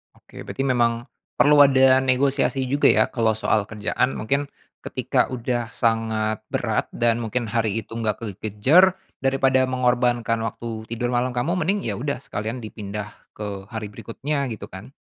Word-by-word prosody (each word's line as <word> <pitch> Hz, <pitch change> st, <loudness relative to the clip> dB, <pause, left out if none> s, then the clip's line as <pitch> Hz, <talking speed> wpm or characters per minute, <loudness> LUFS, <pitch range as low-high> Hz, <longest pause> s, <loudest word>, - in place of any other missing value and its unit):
Oke, -, -, -22 dB
berarti 135 Hz, -, -3 dB
memang 120 Hz, -3 st, +1 dB, 0.3 s
perlu 145 Hz, 0 st, +5 dB
ada 130 Hz, -2 st, +6 dB
negosiasi 135 Hz, +1 st, +1 dB
juga 145 Hz, -, +4 dB
ya -, -, +5 dB
kalau 110 Hz, -3 st, +1 dB
soal 110 Hz, -2 st, 0 dB
kerjaan, 110 Hz, +4 st, -1 dB
mungkin 140 Hz, +6 st, -1 dB, 0.3 s
ketika -, -, 0 dB
udah 120 Hz, -1 st, -2 dB
sangat 110 Hz, -2 st, 0 dB
berat -, -, -1 dB
dan 120 Hz, 0 st, +2 dB
mungkin 120 Hz, +2 st, -2 dB
hari 110 Hz, -1 st, 0 dB
itu -, -, -30 dB
enggak 110 Hz, -2 st, -1 dB
kekejer 110 Hz, -, +3 dB, 0.2 s
daripada 135 Hz, -1 st, +2 dB
mengorbankan 125 Hz, -2 st, +1 dB
waktu 115 Hz, -1 st, -6 dB
tidur 120 Hz, +1 st, -2 dB
malam 125 Hz, 0 st, 0 dB
kamu 170 Hz, +9 st, 0 dB
mending, 195 Hz, +4 st, 0 dB
ya -, -, -3 dB
udah 140 Hz, -1 st, -3 dB
sekalian 110 Hz, +3 st, -5 dB
dipindah 105 Hz, -1 st, -6 dB, 0.2 s
ke 100 Hz, -2 st, -6 dB
hari 110 Hz, -2 st, -6 dB
berikutnya 140 Hz, +6 st, -3 dB
gitu 110 Hz, -3 st, -7 dB
kan. 100 Hz, +8 st, -10 dB
120 Hz, 150 wpm, -23 LUFS, 110-130 Hz, 0.3 s, ada